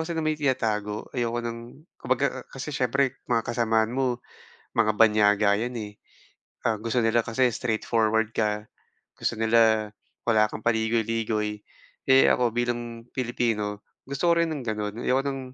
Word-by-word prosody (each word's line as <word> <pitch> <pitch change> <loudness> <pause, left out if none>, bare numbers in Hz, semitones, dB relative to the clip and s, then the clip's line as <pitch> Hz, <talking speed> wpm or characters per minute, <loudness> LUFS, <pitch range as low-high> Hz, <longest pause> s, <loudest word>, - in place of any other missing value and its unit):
kasi 170 - -3
nang 160 -1 -1
may 155 -1 -1
tinatago, 110 -7 -1
ayoko 120 -1 -1
ng 115 0 -4 0.4
kumbaga, - - +1 0.2
ah, - - -30
kasi 135 +3 -6
siyempre 135 -1 0
mga 115 -2 +2
kasamahan 115 -2 +1
mo, 125 -2 0 0.6
mga 110 -2 +3
banyaga 105 -2 +4
'yan, 120 +2 -3
eh. 105 -1 -7 0.7
Ah, 115 -2 +2
gusto 115 +3 -1
nila 115 +1 +3
kasi 125 +3 +2
straightforward 110 -1 0
ka, 105 -1 0 0.5
gusto - - -1
nila 110 -1 +3 0.4
wala 110 -2 +3
kang 110 - -7
paligoy-ligoy, 110 -2 0 0.5
eh, 130 0 +7
ako, 120 -1 +3
bilang 120 -1 -3
Pilipino 115 -5 -1 0.2
gusto 140 +5 0
ko 170 - +4
rin 170 - +3
ng 140 - -5
gano'n. 105 0 -3
Ayoko 130 +1 +2
ng, 135 -1 -2
115 Hz, 150 wpm, -26 LUFS, 110-125 Hz, 0.7 s, eh